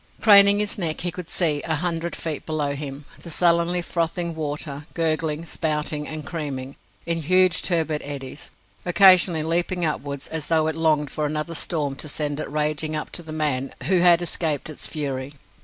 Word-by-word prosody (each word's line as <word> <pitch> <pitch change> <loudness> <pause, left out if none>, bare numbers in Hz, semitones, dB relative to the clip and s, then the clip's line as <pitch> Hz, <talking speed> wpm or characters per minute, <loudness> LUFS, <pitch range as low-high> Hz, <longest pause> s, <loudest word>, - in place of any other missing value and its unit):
Craning 200 -1 +7
his 210 +1 0
neck, 160 -4 -1
he 175 0 -1
could 175 -2 -8
see, 155 -6 +2
a 160 - 0
hundred 170 +1 -2
feet 155 -3 -4
below 150 -3 -2
him, 140 0 -7 0.2
the 170 - -10
sullenly 170 +1 +2
frothing 170 0 -2
water, 150 -1 -5
gurgling, 160 -1 -1
spouting, 150 -2 -2
and 155 -1 -6
creaming, 140 -5 -5 0.3
in 170 -1 0
huge 185 +3 +4
turbid 160 -4 0
eddies, 140 -1 -6 0.3
occasionally 180 -3 +6
leaping 175 +2 0
upwards 140 -2 -3
as 160 -2 -4
though 160 -1 +2
it 160 0 -1
longed 155 -3 +1
for 150 -1 -2
another 155 +2 -3
storm 150 -4 -1
to 150 - -5
send 145 0 -2
it - - -4
raging 155 +1 -1
up 150 - -5
to - - -2
the 160 -2 -10
man 145 -4 -1
who 185 0 +2
had 175 0 +5
escaped 160 -3 -1
its 155 - -2
fury. 140 -3 -4
155 Hz, 175 wpm, -23 LUFS, 150-170 Hz, 0.3 s, Craning